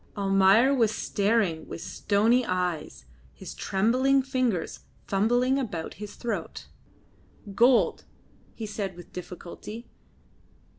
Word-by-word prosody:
Almayer 195 +6 +4
was 235 -5 +3
staring 200 -7 0
with - - -7
stony 220 +8 +1
eyes, 175 - -3 0.3
his 65 - -9
trembling 250 - +2
fingers 255 - -1 0.3
fumbling 245 +7 +2
about 175 -11 -4
his 210 -1 -7
throat. 195 - -5 0.9
"Gold," 240 +5 +3 0.5
he 225 - -5
said 205 -3 -4
with 175 -1 -13
difficulty. 180 +6 -8
205 Hz, 100 wpm, -27 LUFS, 180-240 Hz, 0.9 s, Almayer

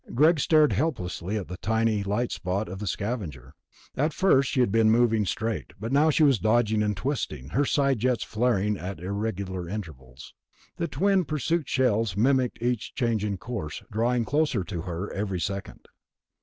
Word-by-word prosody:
Greg 155 +5 +5
stared 155 +1 +4
helplessly 105 - -2
at 100 - -5
the 90 - -7
tiny 110 0 +1
light 105 +5 -1
spot 95 +4 -2
of 95 +2 -7
the 105 - -5
Scavenger. 85 - -4 0.4
At 150 +3 0
first 140 -9 +3
she 135 - -1
had 125 -5 +3
been 110 0 +4
moving 115 -2 +3
straight, 110 +3 -3
but 115 +4 -4
now 145 +3 +4
she 155 +1 +3
was 135 -7 +4
dodging 110 0 +2
and 105 -2 0
twisting, 85 - -3
her 140 - +1
side 140 -3 +2
jets 125 +1 +1
flaring 105 -3 0
at 95 +1 -6
irregular 95 -2 -3
intervals. 70 - -8 0.4
The 170 - -1
twin 190 +7 +2
pursuit 155 +1 -1
shells 115 -6 +1
mimicked 125 0 +1
each 120 -2 -1
change 115 -4 0
in 100 -2 -2
course, 100 -8 -6
drawing 120 +2 +1
closer 145 -8 +1
to 85 -1 -5
her 90 +3 -5
every 100 -2 -2
second. 100 +2 -5
110 Hz, 170 wpm, -26 LUFS, 95-130 Hz, 0.4 s, Greg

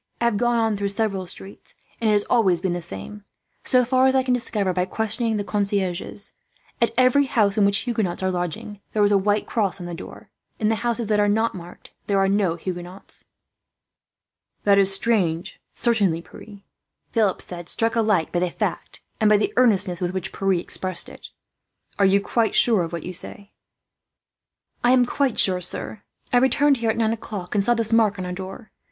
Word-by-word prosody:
I 235 - 0
have 235 -3 +2
gone 240 +1 +1
on 225 -2 +1
through 200 0 -2
several 200 -2 -1
streets, 195 +2 -8 0.3
and 225 - +2
it - - +4
has 205 -1 +2
always 195 -8 +2
been 185 -3 -1
the 175 - -3
same 165 - -7 0.4
so 250 -1 +3
far 255 +2 +3
as 265 - +2
I 260 - +3
can 255 -1 +1
discover 210 -6 -1
by 180 0 0
questioning 220 +2 -1
the 205 - -2
concierges 200 -1 -1 0.5
at 235 - +4
every 255 +2 +4
house 215 -6 +2
in 210 -2 +3
which 200 +3 +1
Huguenots 210 -7 -2
are 185 - +1
lodging, 180 +3 -4
there 210 - +2
is 205 - +3
a 200 - +5
white 205 +2 0
cross 195 -5 -1
on 175 - -7
the 175 - -6
door. 170 - -10 0.3
In 215 -2 0
the 220 0 -1
houses 235 -1 -1
that 210 0 +1
are 205 - +3
not 220 +3 +1
so 185 - -8
marked, 175 +1 -13 0.2
there 200 - +1
are 195 0 +3
no 195 -4 +1
Huguenots." 180 +2 -8 1.4
"That 200 -1 +4
is 195 0 +4
strange, 195 -4 0
certainly, 200 -9 +2
Pierre," 205 +1 -13 0.5
Philip 215 -5 +1
said, 175 -1 -7
struck 225 0 +1
alike 210 -8 +1
by 175 - 0
the 180 0 0
fact - - -4 0.2
and 215 -2 +4
by 210 - +5
the 210 - -1
earnestness 195 -8 +2
with 180 0 -1
which 185 - -4
Pierre 195 0 +1
expressed 185 0 -2
it. - - -12 0.7
"Are 200 - +5
you 195 +1 +4
quite 225 +3 0
sure 225 -6 +5
of 165 -1 -3
what 170 -2 -5
you 180 - -6
say?" 200 +2 -8 1.3
"I 245 +1 +5
am 250 -1 +4
quite 270 -1 -1
sure, 185 -1 +5
sir. 190 +4 -4 0.3
I - - +6
returned 265 +3 +3
here 230 -1 -1
at 220 - 0
nine 225 -1 +1
o'clock, 205 -5 -7
and 205 -2 +2
saw 240 +4 +2
this 225 -1 0
mark 215 -3 +3
on 185 - -4
our 180 - -4
door. 190 +4 -8
205 Hz, 205 wpm, -23 LUFS, 185-230 Hz, 1.4 s, I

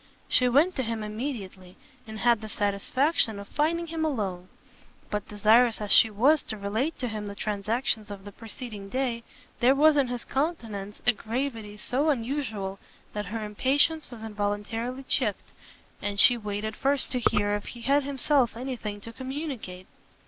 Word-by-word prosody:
She 250 0 +4
went 305 +9 +4
to - - +1
him 225 -3 -3
immediately, 210 -5 -6 0.3
and 220 0 -7
had 235 -2 +4
the 215 - -7
satisfaction 215 +5 +1
of 200 0 -8
finding 330 +3 0
him 325 -1 -3
alone: 195 - -2 0.6
but 210 -1 -2
desirous 220 +3 +4
as 210 -2 -3
she 225 - +8
was 265 +9 +4
to 215 - -4
relate 220 +10 -1
to 250 - -2
him 215 -2 -4
the 200 - -6
transactions 215 +2 -1
of 200 -1 -8
the 205 - -8
preceding 220 -2 -8
day, 250 -1 -1 0.4
there 255 +3 +5
was 300 +1 +5
in 275 -2 +3
his 245 -1 -4
countenance 225 - -3
a 245 - +7
gravity 225 -2 -4
so 275 +8 0
unusual, 225 -7 -2 0.3
that 210 -1 -3
her 215 +2 -3
impatience 285 +9 +1
was 235 -3 -9
involuntarily 220 +4 -3
checked, - - -1 0.5
and 205 -1 -1
she 245 - +8
waited 210 -1 -4
first 275 0 +1
to 250 - +1
hear 205 -3 +2
if 205 0 -2
he 240 - -8
had 280 +4 +3
himself 270 -3 +1
any 260 +1 -3
thing 210 -3 -6
to 230 +3 -9
communicate. 260 - -5
230 Hz, 170 wpm, -27 LUFS, 205-265 Hz, 0.6 s, she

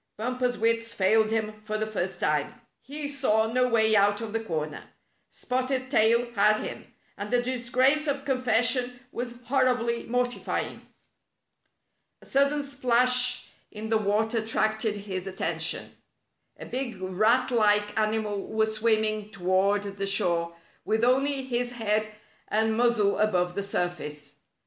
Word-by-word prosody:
Bumper's 250 +2 -1
wits 230 +1 0
failed 215 +3 +3
him 215 -1 -2
for 215 0 -3
the 215 - -1
first 190 -4 -3
time. 150 -1 -1 0.2
He 290 +2 -5
saw 225 -6 +1
no 250 0 +3
way 220 -2 +3
out 205 0 +3
of 225 -2 -6
the 225 0 -1
corner. 155 -6 -4 0.4
Spotted 255 +1 -3
Tail 235 0 +3
had 215 -1 +3
him, - - -7 0.3
and 205 +1 -4
the 245 - +2
disgrace 255 +4 +1
of 280 -1 -2
confession 250 -1 +1
was 240 0 -6
hor 260 +2 +2
ribly 235 -2 0
mortifying. 245 +1 -2 1.3
A - - -18
sudden 280 +2 +1
splash 250 -2 +2 0.2
in 220 +1 -7
the 220 - +3
water 215 +2 0
attracted 220 0 0
his 195 -2 -5
at 190 0 -8
tention. - - -2 0.6
A - - -9
big 245 -5 -3
rat 215 +8 +1
like 210 -3 +2
animal 215 -2 -1
was 220 0 0
swimming 215 -1 +1
toward 195 +1 +1
the 200 -1 -4
shore, 170 -4 +2 0.3
with 220 +1 0
only 270 +2 +2
his 245 -1 -2
head 215 -2 0 0.4
and 220 +1 +1
muzzle 230 -4 +2
above 180 -4 +1
the 200 - -2
surface. 175 -7 -4
220 Hz, 140 wpm, -27 LUFS, 205-250 Hz, 1.3 s, failed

